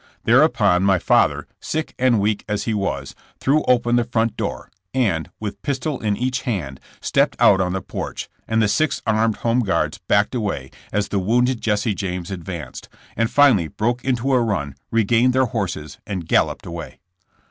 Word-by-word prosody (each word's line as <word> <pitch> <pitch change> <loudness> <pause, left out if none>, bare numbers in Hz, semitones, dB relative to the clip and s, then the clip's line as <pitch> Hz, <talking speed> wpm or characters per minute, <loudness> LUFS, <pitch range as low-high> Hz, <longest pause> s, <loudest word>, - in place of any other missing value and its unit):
Thereupon 90 -3 +4
my 95 -1 +4
father, - - +2
sick 155 0 -3
and 125 -3 +3
weak 105 +1 0
as 105 -1 -1
he 115 - -1
was, 95 -10 -2 0.3
threw 150 +3 +2
open 120 -1 +3
the 120 - +3
front 115 -1 0
door, - - -4 0.2
and, 95 -11 +1
with 100 -2 -5
pistol 140 +1 -2
in 105 -2 -1
each 125 +1 -1
hand 85 - -3 0.2
stepped - - +1
out 95 -1 +5
on 90 -1 0
the 95 - -3
porch, - - -5 0.2
and 110 0 +2
the - - +3
six 155 +7 0
armed 110 -1 +2
Home 115 +1 +3
Guards 105 -6 0
backed 105 +4 +2
away 100 - -3 0.2
as 105 0 -1
the 100 - 0
wounded 120 +5 +1
Jesse 105 0 0
James 90 -2 -4
advanced, 90 -3 -7 0.3
and 115 +1 +1
finally 130 - +4
broke 120 - -2
into 130 +1 0
a 125 - +4
run, 100 - -1 0.2
re 115 0 +2
gained 120 +4 +3
their 130 0 +3
horses 100 -9 -4
and 95 -6 -4
galloped - - +1
away. 85 -2 -7
110 Hz, 180 wpm, -21 LUFS, 95-120 Hz, 0.3 s, out